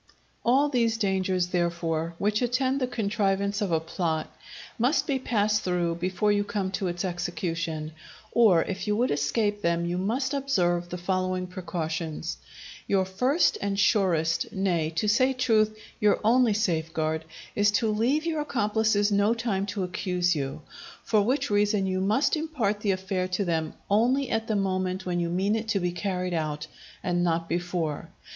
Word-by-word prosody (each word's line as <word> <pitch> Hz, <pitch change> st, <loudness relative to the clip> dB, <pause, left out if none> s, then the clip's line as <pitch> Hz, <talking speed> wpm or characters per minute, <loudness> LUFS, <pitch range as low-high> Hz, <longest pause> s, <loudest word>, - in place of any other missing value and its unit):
All 265 Hz, +5 st, +4 dB
these 230 Hz, -5 st, +1 dB
dangers, 190 Hz, -3 st, 0 dB
therefore, 170 Hz, -2 st, -1 dB
which 210 Hz, +4 st, 0 dB
attend 260 Hz, +2 st, +1 dB
the 255 Hz, -, +1 dB
contrivance 200 Hz, -3 st, 0 dB
of 200 Hz, -4 st, -1 dB
a 165 Hz, -, +3 dB
plot, 160 Hz, -1 st, -3 dB, 0.4 s
must 250 Hz, +7 st, +2 dB
be 275 Hz, -3 st, 0 dB
passed 210 Hz, -4 st, +1 dB
through 175 Hz, -2 st, 0 dB
before 185 Hz, +4 st, 0 dB
you 205 Hz, 0 st, +2 dB
come 200 Hz, -2 st, -2 dB
to 190 Hz, 0 st, -2 dB
its 175 Hz, +2 st, -2 dB
execution; 170 Hz, -3 st, -3 dB, 0.4 s
or 205 Hz, -8 st, +5 dB
if 195 Hz, +2 st, -5 dB
you 210 Hz, -, +2 dB
would 245 Hz, +4 st, +1 dB
escape 205 Hz, +9 st, 0 dB
them, 170 Hz, -1 st, +1 dB
you 175 Hz, +1 st, -1 dB
must 255 Hz, +8 st, -1 dB
observe 175 Hz, -11 st, 0 dB
the 180 Hz, -, -4 dB
following 185 Hz, 0 st, -1 dB
precautions: 165 Hz, -3 st, -4 dB, 0.5 s
Your 190 Hz, -1 st, +2 dB
first 250 Hz, -, +2 dB
and 200 Hz, 0 st, -1 dB
surest, 170 Hz, -6 st, +2 dB
nay, 175 Hz, -5 st, 0 dB
to 190 Hz, +6 st, 0 dB
say 255 Hz, +5 st, +3 dB
truth, 220 Hz, -4 st, +2 dB, 0.2 s
your 210 Hz, -1 st, +3 dB
only 235 Hz, 0 st, +4 dB
safeguard, 160 Hz, -5 st, -1 dB, 0.3 s
is 205 Hz, 0 st, +4 dB
to 225 Hz, +2 st, +2 dB
leave 250 Hz, +9 st, +1 dB
your 320 Hz, -2 st, 0 dB
accomplices 215 Hz, -5 st, +1 dB
no 205 Hz, +3 st, +3 dB
time 210 Hz, -4 st, -1 dB
to 200 Hz, 0 st, -2 dB
accuse 180 Hz, -1 st, 0 dB
you; 140 Hz, +1 st, -4 dB, 0.4 s
for 215 Hz, -2 st, +3 dB
which 250 Hz, +3 st, 0 dB
reason 205 Hz, -1 st, +2 dB
you 185 Hz, 0 st, -1 dB
must 215 Hz, +12 st, +2 dB
impart 280 Hz, -10 st, -1 dB
the 210 Hz, -, -2 dB
affair 185 Hz, -1 st, -1 dB
to 185 Hz, +2 st, -1 dB
them, 160 Hz, -2 st, -1 dB
only 245 Hz, +6 st, +2 dB
at 225 Hz, 0 st, -1 dB
the 220 Hz, -, 0 dB
moment 185 Hz, -1 st, -1 dB
when 175 Hz, -1 st, -1 dB
you 170 Hz, -1 st, -1 dB
mean 190 Hz, +5 st, +1 dB
it 225 Hz, 0 st, -3 dB
to 215 Hz, -3 st, +1 dB
be 180 Hz, -1 st, -1 dB
carried 180 Hz, -1 st, -2 dB
out, 155 Hz, -2 st, -2 dB, 0.4 s
and 175 Hz, -1 st, 0 dB
not 165 Hz, -1 st, 0 dB
before. 170 Hz, -2 st, -2 dB
195 Hz, 165 wpm, -27 LUFS, 175-220 Hz, 0.5 s, or